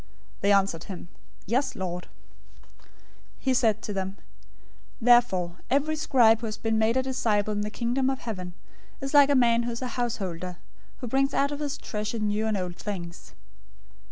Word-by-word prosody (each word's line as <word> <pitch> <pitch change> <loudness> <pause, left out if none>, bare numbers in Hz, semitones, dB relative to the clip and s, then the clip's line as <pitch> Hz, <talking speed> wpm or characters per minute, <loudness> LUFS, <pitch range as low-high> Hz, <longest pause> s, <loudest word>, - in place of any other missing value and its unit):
They 200 - +2
answered 195 -4 +2
him, 180 -3 -8 0.4
"Yes, 250 +8 0
Lord." 180 -1 -4 0.5
013:052 - - -26 0.7
He 265 - 0
said 220 -4 +2
to 210 - -4
them, 190 0 -3 0.8
"Therefore, 220 -8 +4
every 290 +3 +2
scribe 240 -7 +4
who 230 - -4
has 215 - -4
been 225 -1 0
made 225 +3 +2
a 260 - +2
disciple 215 -5 0
in 205 - -1
the 210 - -2
Kingdom 245 +4 0
of 265 - -1
Heaven 185 -6 -5 0.5
is 275 +1 -5
like 285 -1 +7
a 285 - +4
man 235 -2 +4
who 240 0 -2
is 235 +2 -5
a 250 - -2
householder, 185 -7 -3 0.4
who 250 - -4
brings 270 +3 +1
out 280 +1 +2
of 290 - -4
his 290 -2 -3
treasure 215 +1 -4
new 215 0 0
and 215 -2 0
old 180 -1 -4
things." 175 -4 -7
220 Hz, 180 wpm, -27 LUFS, 195-255 Hz, 0.8 s, like